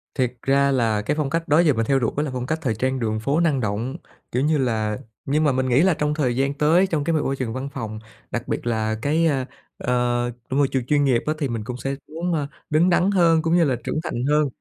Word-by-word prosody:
Thiệt 125 -2 0
ra 140 +1 +3
là 115 -5 +1
cái 150 +8 -1
phong 150 -3 -1
cách 165 +2 -2
đó 150 +3 +4
giờ 160 -5 +4
mình 115 -1 0
theo 135 -1 +2
đuổi 115 - 0
là 150 -1 0
phong 125 -1 -3
cách 160 +3 -2
thời 115 -7 -1
trang 130 +3 -1
đường 110 -2 -1
phố 140 +8 0
năng 155 -6 +2
động. 115 +7 -2 0.3
Kiểu 125 - 0
như 155 0 +2
là 110 -5 0 0.3
nhưng 150 +3 +1
mà 145 - +3
mình 130 0 0
nghĩ 125 +5 +4
là 185 -1 +4
trong 150 0 -1
thời 130 -6 0
gian 135 +2 +1
tới, 165 +6 +3
trong 155 -5 -1
cái 165 - 0
m - - +3
môi 135 - -1
trường 120 -4 -3
văn 135 +2 -4
phòng, 110 -1 -5 0.3
đặc 120 +1 -3
biệt - - -3
là 110 -1 0
cái, 160 +5 +2
ờ, 135 -4 0 0.3
ờ, 120 0 0 0.2
môi 140 +1 +2
trường 130 -3 -2
chuyên 145 +1 +2
nghiệp 125 -4 +2
á, 155 - +1
thì 140 -4 -1
mình 115 -2 -3
cũng 125 +2 -5
sẽ 135 +3 -3 0.2
muốn, 170 +1 -2
à, 145 -3 -1 0.2
đứng 160 +4 +3
đắn 180 +3 +3
hơn 165 -4 +4
cũng 165 +1 +1
như 170 - +5
là 135 -5 +1
trưởng 155 - -2
thành 120 -4 -3
hơn. 150 -1 +3
135 Hz, 265 wpm, -23 LUFS, 120-155 Hz, 0.3 s, như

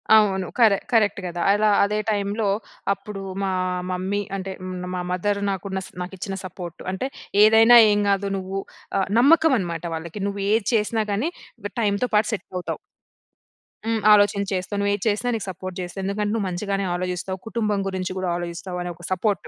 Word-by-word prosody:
అవును 190 -4 +3
కరే 215 -4 +6
కరెక్ట్ 210 -4 +3
కదా. 175 -1 -4
అలా 210 +1 +3
అదే 210 +1 0
టైమ్‌లో 205 +1 -1 0.5
అప్పుడు 200 0 -8 0.2
మా 195 - 0 0.4
మమ్మీ 190 +3 -1
అంటే 190 0 -4 0.4
మా 180 - -2
మదర్ 200 +3 0
నాకు, 195 0 -4 0.3
నాకు 180 +2 -5
ఇచ్చిన 195 +1 -4
సపోర్ట్. 175 -2 -8
అంటే 190 +8 -2 0.4
ఏదైనా 225 +2 +8
ఏమి 205 0 +2
కాదు 200 0 +1
నువ్వు, 190 +1 -4 0.6
నమ్మకం 320 +3 +5
అన్నమాట 170 -2 -4
వాళ్ళకి. 170 +5 -6
నువ్వు 200 0 -3
ఏది 220 -1 +2
చేసినా 220 0 +1
గాని 225 +11 0 0.5
టైమ్‌తో 210 +3 +1
పాటు 215 +1 +3
సెట్ 210 - -4
అవుతావు. 180 - -3 1.1
హ్మ్, 225 -1 +1
ఆలోచించి 205 -1 +4
చేస్తావు 185 +2 -2
నువ్వు 200 0 +1
ఏది 205 - -3
చేసినా 215 +3 +1
నీకు 215 - -4
సపోర్ట్ 185 0 -6
చేస్తా, 175 +2 -7
ఎందుకంటే 205 +2 -1
నువ్వు 215 -4 0
మంచిగానే 195 +2 -2
ఆలోచిస్తావు 180 +1 -3
కుటుంబం 215 -3 0
గురించి 185 -1 -3
కూడా 185 -1 -1
ఆలోచిస్తావు 175 +1 -5
అనే 175 - -4
ఒక 175 - -16
సపోర్ట్. 200 +2 0
200 Hz, 165 wpm, -23 LUFS, 185-210 Hz, 1.1 s, ఏదైనా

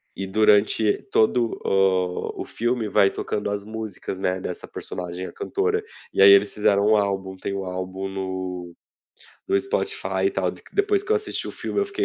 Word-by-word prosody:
E 95 - -3
durante 105 +1 +3
todo 115 +1 +2
o 95 -2 +1
o - - -4
filme 120 -1 -1
vai 100 -1 +5
tocando 105 0 -3
as 100 0 -3
músicas, 110 -3 -6
né, 95 0 0
dessa 90 -1 -6
personagem, 90 +1 -6
a - - -10
cantora. 430 +2 -1 0.3
E - - +2
aí 100 - +10
eles 100 +1 +5
fizeram 105 -1 +3
um 110 - +5
álbum 95 -2 -1
tem 100 - -4
um 100 -1 -3
álbum 95 +1 -4
no 95 -2 -5 0.7
no 390 0 +3
Spotify 435 +1 -2
e - - +2
tal, 390 - 0
de - - -14
que - - -20
depois 405 0 +2
que 415 - -11
eu - - +5
assisti 430 - -4
o - - -4
filme, - - -2
eu 405 - +2
fiquei 400 -1 -2
100 Hz, 195 wpm, -24 LUFS, 95-120 Hz, 0.7 s, aí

